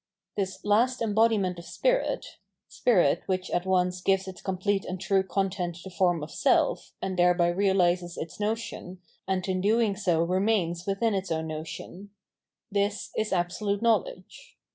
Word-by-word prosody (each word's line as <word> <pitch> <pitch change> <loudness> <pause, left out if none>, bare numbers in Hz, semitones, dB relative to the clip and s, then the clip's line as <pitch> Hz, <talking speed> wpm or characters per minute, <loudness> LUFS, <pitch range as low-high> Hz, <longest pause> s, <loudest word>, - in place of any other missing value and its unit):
This 190 -1 -3
last 235 +5 +3
embodiment 215 -5 +2
of 170 - -11
spirit - - -1
— - - -58
spirit 185 - +3
which 185 -1 -2
at 175 +1 -1
once 180 -1 +1
gives 190 0 +1
its 185 -1 -8
complete 195 +1 -1
and 185 0 -5
true 195 +1 +2
content 190 -2 -2
the 190 - -9
form 175 -4 +1
of 150 - -7
self, - - +1
and 185 -1 -2
thereby 175 -1 +4
realises 180 -2 +1
its 160 +2 -6
notion, 210 -4 -3 0.3
and 190 -1 -1
in 185 -1 0
doing 215 0 +2
so 175 -5 +1
remams 180 -2 0
within 205 +3 +1
its 190 -2 -2
own 160 0 -1
notion 160 +5 -7 0.3
— 220 - -26
^this 200 +1 0
is 215 0 -1
Absolute 200 +4 -1
Know 230 -1 +6
ledge. - - -12
190 Hz, 165 wpm, -27 LUFS, 180-205 Hz, 0.3 s, Know